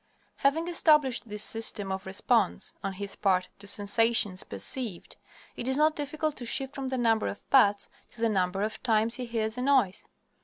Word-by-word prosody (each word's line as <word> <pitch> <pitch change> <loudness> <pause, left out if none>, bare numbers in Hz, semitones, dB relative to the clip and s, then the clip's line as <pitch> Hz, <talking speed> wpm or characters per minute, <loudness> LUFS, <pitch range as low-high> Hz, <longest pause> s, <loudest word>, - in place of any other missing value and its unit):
Having 315 +5 +1
established 300 -8 +2
this 210 0 +1
system 215 -3 0
of 190 0 -5
response 195 0 +1
on 195 -1 -3
his 200 +1 -6
part 185 -2 +1
to 200 - -9
sensations 205 -1 +1
perceived, 190 - -3 0.4
it 240 - -4
is 265 +1 +2
not 305 +1 +3
difficult 300 +1 -3
to 250 - -6
shift 270 +3 0
from 270 -2 -5
the 260 - -2
number 225 -2 +2
of - - -7
pats 205 -6 +4 0.2
to - - -16
the 230 - +2
number 190 -2 0
of 215 +1 -4
times 225 -1 +2
he 250 0 -4
hears 225 0 -2
a - - -2
noise. 255 -8 +1
225 Hz, 185 wpm, -28 LUFS, 200-265 Hz, 0.4 s, pats